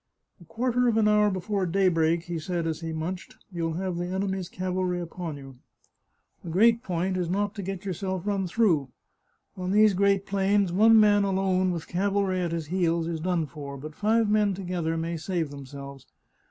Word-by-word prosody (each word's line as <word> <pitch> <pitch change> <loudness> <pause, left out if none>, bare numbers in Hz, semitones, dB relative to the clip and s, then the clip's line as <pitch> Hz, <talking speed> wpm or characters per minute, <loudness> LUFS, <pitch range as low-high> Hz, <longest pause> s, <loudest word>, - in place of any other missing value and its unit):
" - - -34
A - - -14
quarter 245 +5 0
of 225 -2 +2
an 215 -1 +4
hour 210 0 +4
before 190 0 -2
daybreak," 170 -3 +2
he 175 -1 -4
said 170 +1 -3
as 160 -1 -2
he 165 -1 -5
munched, 165 +4 -5
" - - -44
you'll 165 -2 -2
have 180 +1 -3
the 175 0 -2
enemy's 190 -1 -2
cavalry 185 -1 -2
upon 170 -2 -6
you. 135 -2 -12 0.9
The 170 - -7
great 225 +7 +4
point 185 -3 -2
is 175 -2 -1
not 205 +2 0
to 210 - -6
get 195 0 -5
yourselves 190 0 -3
run 200 -2 0
through. 170 - +2 0.7
On 185 -1 -4
these 210 +1 +5
great 200 +1 +2
plains 195 -1 +1
one 220 +3 +6
man 205 -1 +5
alone 190 -1 +1
with 170 -3 -4
cavalry 195 0 0
at 170 -2 -1
his 165 -2 -3
heels 170 -3 +1
is 165 -1 -3
done 175 -1 0
for, 140 -2 -8
but 150 +3 -8
five 220 +5 +2
men 210 -2 +2
together 175 -3 -2
may 165 +1 -2
save 165 -2 -2
themselves. 140 -1 -10
185 Hz, 195 wpm, -26 LUFS, 165-200 Hz, 0.9 s, one